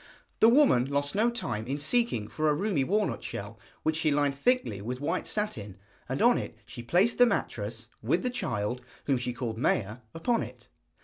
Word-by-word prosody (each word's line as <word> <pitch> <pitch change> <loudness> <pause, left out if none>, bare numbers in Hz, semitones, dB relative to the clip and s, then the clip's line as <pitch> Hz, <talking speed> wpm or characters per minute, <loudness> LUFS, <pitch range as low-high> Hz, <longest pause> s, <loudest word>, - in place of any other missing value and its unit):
The 225 - +7
woman 245 - +5
lost 140 +1 -1
no 220 +4 +3
time 120 - -3
in 135 +2 -1
seeking 150 - +1
for 155 +5 0
a 150 - +3
roomy 185 -4 0
walnut 205 +6 0
shell, - - -6 0.2
which 155 0 +1
she 160 - +2
lined 145 -1 +2
thickly 140 - +1
with 125 +4 -4
white 145 - -2
satin, 110 - -3 0.3
and - - 0
on - - +5
it - - -7
she - - -8
placed 180 - +2
the 245 - +8
mattress, - - -2 0.2
with - - +1
the 250 - 0
child, 120 - -2 0.2
whom 135 -3 +2
she 125 0 -2
called 120 -2 -4
Maia, 110 -2 +1 0.2
upon 230 +8 +1
it. - - -9
145 Hz, 190 wpm, -29 LUFS, -, 0.3 s, the